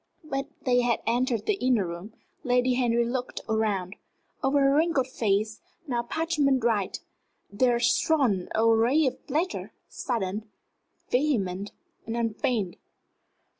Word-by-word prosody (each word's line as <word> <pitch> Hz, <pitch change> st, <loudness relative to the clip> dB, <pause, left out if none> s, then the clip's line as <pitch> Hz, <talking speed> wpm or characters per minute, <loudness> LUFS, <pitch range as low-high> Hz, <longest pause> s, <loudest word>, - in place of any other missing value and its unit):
But 275 Hz, -3 st, -3 dB, 0.2 s
they 245 Hz, -1 st, +3 dB
had 240 Hz, -1 st, 0 dB
entered 240 Hz, -1 st, 0 dB
the 405 Hz, -2 st, 0 dB
inner 245 Hz, -6 st, +3 dB
room. 175 Hz, +6 st, -7 dB, 0.3 s
Lady 250 Hz, -1 st, +2 dB
Henry 235 Hz, -2 st, +2 dB
looked 245 Hz, +1 st, -3 dB
round. 210 Hz, -4 st, -1 dB, 0.5 s
Over 270 Hz, +2 st, +3 dB
her 275 Hz, 0 st, +4 dB
wrinkled 310 Hz, -3 st, +2 dB
face, 215 Hz, -3 st, -1 dB, 0.2 s
now 245 Hz, -5 st, -1 dB
parchment 285 Hz, -1 st, +1 dB
white, 215 Hz, -5 st, 0 dB, 0.5 s
there 240 Hz, +3 st, +2 dB
shone 235 Hz, -, +2 dB
a 225 Hz, +1 st, +3 dB
ray 235 Hz, +7 st, +4 dB
of 260 Hz, -, -3 dB
pleasure 315 Hz, +7 st, -2 dB, 0.2 s
sudden, 215 Hz, -4 st, -3 dB, 0.6 s
vehement, 205 Hz, -8 st, 0 dB, 0.4 s
and 230 Hz, +1 st, -2 dB
unfeigned. 225 Hz, -4 st, -1 dB
240 Hz, 125 wpm, -27 LUFS, 215-270 Hz, 0.6 s, her